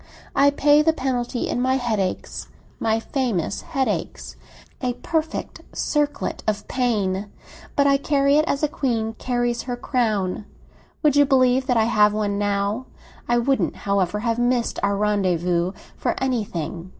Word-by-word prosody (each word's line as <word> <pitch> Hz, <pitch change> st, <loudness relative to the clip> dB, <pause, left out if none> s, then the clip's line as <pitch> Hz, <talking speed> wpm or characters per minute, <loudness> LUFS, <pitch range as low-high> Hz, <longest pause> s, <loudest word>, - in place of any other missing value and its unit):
I 280 Hz, +1 st, +6 dB
pay 290 Hz, +1 st, +4 dB
the 320 Hz, +1 st, +3 dB
penalty 250 Hz, -4 st, -2 dB
in 245 Hz, -, -1 dB
my 260 Hz, +1 st, +2 dB
headaches, 220 Hz, -7 st, -2 dB, 0.3 s
my 225 Hz, 0 st, +1 dB
famous 225 Hz, -, -2 dB
headaches—a 165 Hz, -, -4 dB
perfect 320 Hz, -1 st, -2 dB, 0.2 s
circlet 295 Hz, -1 st, -1 dB
of 210 Hz, -1 st, -1 dB
pain! 205 Hz, -6 st, 0 dB, 0.5 s
But 280 Hz, -, +3 dB
I 275 Hz, 0 st, +5 dB
carry 280 Hz, 0 st, +2 dB
it 305 Hz, -, +3 dB
as 280 Hz, -2 st, -1 dB
a -, -, +4 dB
queen 230 Hz, -6 st, -1 dB
carries 240 Hz, -1 st, 0 dB
her 245 Hz, -, -2 dB
crown. 215 Hz, -7 st, -1 dB, 0.6 s
Would 295 Hz, -2 st, +4 dB
you 290 Hz, 0 st, +6 dB
believe 260 Hz, -1 st, +3 dB
that 250 Hz, -3 st, +2 dB
I 225 Hz, -, +4 dB
have 210 Hz, -2 st, +4 dB
one 205 Hz, -1 st, -1 dB
now? 205 Hz, +4 st, -1 dB, 0.4 s
I 240 Hz, -, +4 dB
wouldn't, 265 Hz, +3 st, +1 dB
however, 200 Hz, 0 st, +1 dB
have 230 Hz, +1 st, 0 dB
missed 240 Hz, -1 st, +1 dB
our 200 Hz, 0 st, +1 dB
rendezvous 180 Hz, -4 st, +1 dB, 0.3 s
for -, -, -1 dB
anything. 190 Hz, -, -3 dB
235 Hz, 145 wpm, -23 LUFS, 200-265 Hz, 0.6 s, I